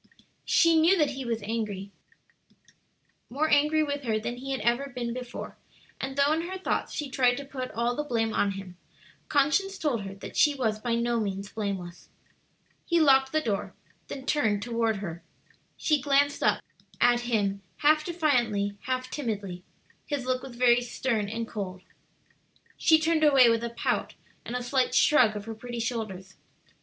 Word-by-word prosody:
She 330 -1 +5
knew 355 +4 +5
that 300 -4 +2
he 270 -1 -5
was 230 -2 -2
angry, 205 -3 -3 1.4
more 300 +5 0
angry 300 +2 +4
with 285 -1 -3
her 225 -5 0
than 240 +3 -4
he 270 +2 -7
had 265 - -2
ever 240 +4 +1
been 245 -2 -4
before, 250 -1 -7 0.4
and 270 0 -4
though 280 +2 +4
in 330 +2 -2
her 380 - -4
thoughts 375 - -2
she 300 - -3
tried 250 -2 +2
to 280 - -6
put 260 -2 -5
all 235 +1 -1
the 295 - -2
blame 225 -5 -1
on 200 -1 +1
him, 190 -2 -9 0.5
conscience 310 +8 +2
told 270 -8 -1
her 195 0 -7
that 195 - -10
she 295 -2 +4
was 220 -5 -1
by 235 +1 -1
no 235 0 0
means 200 -1 -3
blameless. 195 -5 -5 0.7
He 340 -1 +2
locked 270 -3 +5
the 310 - +1
door, 210 -8 -3 0.3
then 265 -1 -7
turned 215 -9 +1
toward 230 -1 0
her. 170 -4 -6 0.6
She 305 -3 +1
glanced 285 +1 +2
up - - +2 0.4
at 245 0 +4
him 205 -5 -1 0.2
half 305 +1 +4
defiantly, 240 - 0
half 255 0 -2
timidly. 205 -9 -4 0.5
His 285 -4 -2
look 255 0 0
was 260 -2 -9
very 245 0 +4
stern 230 -3 -2
and 225 +1 -4
cold. 190 -4 -6 0.9
She 320 - +5
turned 315 0 +1
away 270 -5 +7
with 230 0 0
a 235 - -2
pout 235 - -2 0.3
and 240 - -5
a 250 - -2
slight 255 +1 +1
shrug 250 -8 +5
of 205 0 -6
her 225 - -5
pretty 240 +2 -7
shoulders. 215 -5 -4
245 Hz, 175 wpm, -27 LUFS, 215-285 Hz, 1.4 s, away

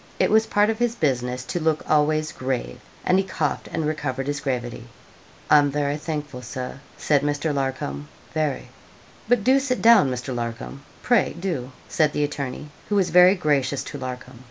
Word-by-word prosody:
It - - +2
was 220 +1 +4
part 205 +1 +3
of 220 - -5
his 240 -1 +1
business 125 - -1
to 175 - -3
look 160 -1 0
always 155 +1 +2
grave, 130 - -3 0.3
and 185 +1 +4
he - - +2
coughed, 160 -6 -2
and 160 -1 -2
recovered 140 -4 -2
his 145 0 -2
gravity. 120 -3 -4 0.6
'I'm 145 -1 +6
very 145 0 -1
thankful, 150 -4 -5
Sir,' 125 +2 -6 0.2
said 145 -2 +2
Mr. 145 +1 -1
Larcom, 130 - -3 0.3
'very.' 155 -3 -2 0.6
'But 245 -4 +3
do 265 +4 +5
sit 260 -2 -1
down, 225 - +6
Mr. 125 +1 -4
Larcom 120 +3 -5 0.2
pray 245 -1 +2
do,' 160 -9 -3 0.2
said 155 -1 +1
the 150 - 0
attorney, 145 0 -4 0.2
who 205 - +1
was 190 -3 +2
very 180 +2 +7
gracious 145 -6 0
to 145 - -7
Larcom. 125 -1 -7
145 Hz, 175 wpm, -23 LUFS, 130-165 Hz, 0.6 s, very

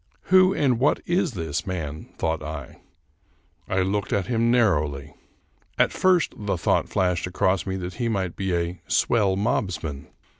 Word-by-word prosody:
Who 185 0 +7
and 135 -10 +1
what 140 +3 +3
is 175 -4 +1
this 80 -5 -3
man? 80 -5 -5
thought 80 -1 -1
I. 75 -3 -7 0.9
I 95 - +1
looked 100 +2 -2
at 100 -2 +1
him 115 -1 +1
narrowly. 75 - +1 0.6
At - - +3
first 185 -3 +2
the 100 -3 -2
thought - - +1
flashed 90 -2 0
across 95 0 0
me 95 - -2
that 90 -1 -5
he 120 - +1
might 95 -5 -2
be 95 -2 -1
a 85 +1 -3
" - - -37
swell 105 -5 +2
mobsman." 95 - -2
95 Hz, 160 wpm, -24 LUFS, 80-115 Hz, 0.9 s, Who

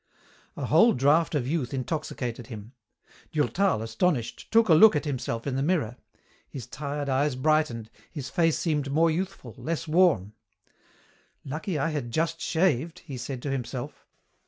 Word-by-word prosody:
A - - -3
whole 230 +1 +5
draft 150 +6 +3
of 130 -4 0
youth 140 -3 -1
intoxicated 130 -3 -4
him. 110 0 -9 0.6
Durtal, 155 - +1
astonished, 115 +3 -1
took 225 0 +4
a 170 - +6
look 185 +4 +8
at 150 - -1
himself 125 -5 -3
in 140 -2 -2
the 135 - 0
mirror. 145 -7 0 0.5
His 130 -5 -7
tired 145 +3 -4
eyes 135 +1 +1
brightened, 130 -5 0 0.2
his 140 -5 -6
face 165 0 +2
seemed 150 -4 -1
more 165 +3 +3
youthful, 175 - -4
less 165 +1 -3
worn. 155 - +3 1.1
"Lucky 155 +5 -3
I 150 +3 0
had 145 -6 -3
just 165 +6 -1
shaved," 165 -1 0
he 140 -5 -7
said 125 0 -6
to 140 - -2
himself. 125 -1 -5
145 Hz, 155 wpm, -27 LUFS, 125-165 Hz, 1.1 s, look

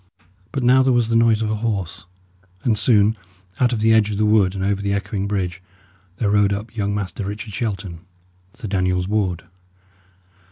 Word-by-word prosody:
But 135 - -2
now 130 +2 +5
there 130 0 +3
was 120 -2 +2
the 115 - +1
noise 115 -1 +3
of 110 - -1
a 110 - -1
horse; 105 -6 -3 0.6
and 115 - +2
soon, 105 -1 +3 0.4
out 125 -1 +3
of 115 -3 -1
the 110 0 +4
edge 110 -1 +4
of 105 - -3
the 110 - +2
wood 105 -3 +3
and 95 - -3
over 100 0 0
the 100 0 -1
echoing 100 0 -2
bridge, 95 -3 -3 0.6
there 105 -3 0
rode 105 -1 +3
up 105 +4 -6
young 100 -2 -1
Master 100 -1 -4
Richard 105 +2 -6
Shelton, 95 -6 -4 0.6
Sir 120 -3 -7
Daniel's 90 -2 0
ward. 95 -5 -1
105 Hz, 190 wpm, -21 LUFS, 100-110 Hz, 0.6 s, now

